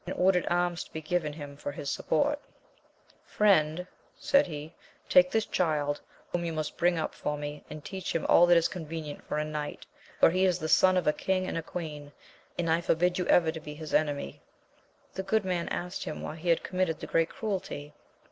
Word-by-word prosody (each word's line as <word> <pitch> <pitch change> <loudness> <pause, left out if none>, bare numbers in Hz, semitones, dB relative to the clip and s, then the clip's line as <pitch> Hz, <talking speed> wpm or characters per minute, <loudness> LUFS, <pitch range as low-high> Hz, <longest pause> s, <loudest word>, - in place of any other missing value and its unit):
ordered 180 -1 +3
alms 175 0 +1
to - - -19
be 160 - -3
given 155 0 -1
him 145 -2 -8
for 145 - -5
his 140 -1 -3
s\x5^oi\». 290 +1 +1 0.9
'Sxv^^^^ - - -23
26 - - -22
AMADIS 170 -6 +4
OF - - -11
OAVL. - - -28 0.3
said 280 -7 +3
he, 155 0 -7 0.3
take 180 0 +6
this 220 +2 +1
child, 150 -4 0 0.3
whom 175 -1 -1
you 170 - -2
must 155 -1 -3
bring 175 0 +2
up 160 - -2
for 150 0 -3
me, 145 0 -6
and 155 -1 -9
teach 190 -3 -4
him 165 - 0
all 175 - +6
that 175 -1 +6
is 170 - +3
convenient 160 -3 -6
for - - -2
a 150 - 0
knight, 150 -1 -5 0.3
for - - +6
he 185 +2 +2
is 180 -2 +3
the 160 -3 -3
son 185 +3 +5
of 180 - +1
a 150 - +4
king 185 +2 0
and 165 -3 -3
queen; 150 -4 -6 0.5
and 175 - -1
I 165 +1 +2
forbid 175 +2 +1
you 180 - -1
ever 165 -2 +5
to 160 - -7
be 150 -1 -8
his 155 0 -8
enemy. 145 - 0 0.7
The 190 - -3
good 200 +2 +1
man 180 -2 -1
asked 180 +1 -4
him, 155 - -5
why 155 - -5
he 170 +2 -3
had 165 - +3
committed 185 -4 -1
that - - -8
great 165 0 +3
cruelty. 185 -8 -4
165 Hz, 220 wpm, -29 LUFS, 150-180 Hz, 0.9 s, take